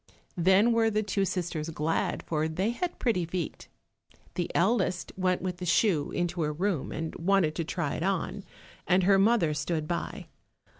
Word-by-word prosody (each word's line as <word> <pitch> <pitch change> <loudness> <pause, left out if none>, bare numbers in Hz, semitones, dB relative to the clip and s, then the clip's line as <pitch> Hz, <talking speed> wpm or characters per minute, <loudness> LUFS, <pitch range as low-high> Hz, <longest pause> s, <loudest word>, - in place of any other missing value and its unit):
Then 190 +6 +5
were 230 -1 +3
the 215 0 0
two 200 -1 0
sisters 175 -4 -3
glad, 160 0 -1
for 155 -1 -1
they 185 +8 -1
had 350 +9 -3
pretty 220 -8 +1
feet. 170 -1 -4 0.7
The 175 - -2
eldest 185 -3 +1
went 185 -1 0
with 180 -1 -3
the 180 - -5
shoe 170 -4 +2
into 175 0 -2
her 150 -1 0
room 175 -2 -1
and 160 +1 -4
wanted 175 -3 +2
to 170 - 0
try 160 -2 -2
it - - -3
on, 195 +1 -1 0.4
and 185 0 +4
her 195 +1 +5
mother 195 -6 +3
stood 155 +1 -2
by. 170 +1 -3
180 Hz, 170 wpm, -28 LUFS, 165-195 Hz, 0.7 s, Then